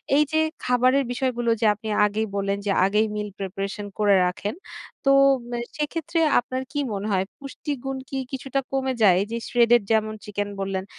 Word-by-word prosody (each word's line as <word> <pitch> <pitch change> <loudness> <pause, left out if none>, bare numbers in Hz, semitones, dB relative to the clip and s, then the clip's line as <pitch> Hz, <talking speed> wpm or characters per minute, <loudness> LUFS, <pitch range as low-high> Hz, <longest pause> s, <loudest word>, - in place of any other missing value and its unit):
এই 300 - +5
যে 315 - +1 0.3
খাবারের 255 +2 +3
বিষয়গুলো 245 -2 -1
যে 225 - +3
আপনি 215 +2 -10 0.2
আগেই 215 +2 -1
বললেন 200 0 0
যে 200 - +1
আগেই 210 +3 +2
মিল 210 0 -3
প্রিপারেশন 195 +2 -4
করে 205 -2 +5
রাখেন 200 - -3 0.5
তো, 275 - +2 0.4
মে 240 - -2 0.2
সেক্ষেত্রে 330 +2 -2 0.2
আপনার 255 +1 -4
কী 290 - -2
মনে 200 +2 -3
হয় 190 0 +1
পুষ্টিগুণ 270 -1 -5
কী 270 - -3
কিছুটা 270 +1 -2
কমে 265 -1 0
যায়? 190 -4 +6
এই - - -1
যে 235 - -1
শ্রেডেড 240 -1 +4
যেমন 215 0 +2
চিকেন 205 0 -3
বললেন, 190 -1 -2
230 Hz, 175 wpm, -24 LUFS, 205-265 Hz, 0.5 s, যায়